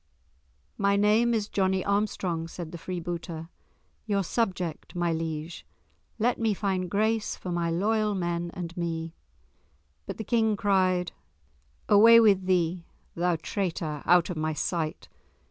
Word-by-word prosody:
"My 200 0 +3
name 210 +4 +3
is 215 -3 0
Johnie 190 -2 0
Armstrong," 200 -5 -1
said 165 -1 -7
the 170 - -8
freebooter, 170 -2 -5 0.6
"your 200 -2 +1
subject, 185 -6 -2
my 175 -1 0
liege; 160 0 -4 0.5
let 240 +3 +1
me 220 -3 +1
find 185 -3 -1
grace 215 +3 0
for 180 - -6
my 170 -1 0
loyal 210 +4 +1
men 175 -1 -2
and 175 -2 -6
me." 165 -2 -3 0.9
But - - -5
the 220 - -4
King 220 -1 +1
cried, 185 -3 +2 0.8
"Away 225 +3 +8
with 195 -4 +4
thee, 175 -1 +1 0.3
thou 175 0 +1
traitor, 160 -4 -3
out 175 0 +4
of 175 - -5
my 155 0 -1
sight! 160 0 -3
180 Hz, 135 wpm, -27 LUFS, 170-205 Hz, 0.9 s, Away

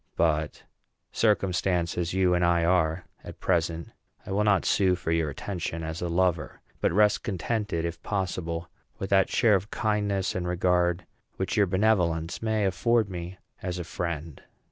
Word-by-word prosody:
But, 75 -2 0 0.5
circumstanced 90 -5 +1
as 85 -1 -1
you 95 -1 +2
and 90 0 +2
I 85 -1 +3
are 85 -1 +2 0.2
at - - -10
present, 85 -2 0 0.4
I - - -7
will 100 +2 +2
not 105 -3 +3
sue 95 -3 +3
for 85 -2 -3
your 80 -2 +1
attention 85 +1 -4
as 80 +1 -5
a 90 - -2
lover, 85 -4 0 0.2
but - - +1
rest 105 +3 +3
contented, 105 -3 -2
if 85 0 -5
possible, 85 -4 -3 0.3
with 95 - -5
that 95 -1 +4
share 115 -3 +4
of 100 +2 +1
kindness 105 -3 0
and 90 -1 -3
regard 90 -1 +1 0.3
which - - -2
your 100 - +4
benevolence 90 -4 +1
may 110 -2 +1
afford 100 +4 +1
me 90 +1 -6 0.2
as 90 -1 -3
a 90 - -3
friend." 85 -3 -5
90 Hz, 165 wpm, -27 LUFS, 85-100 Hz, 0.5 s, that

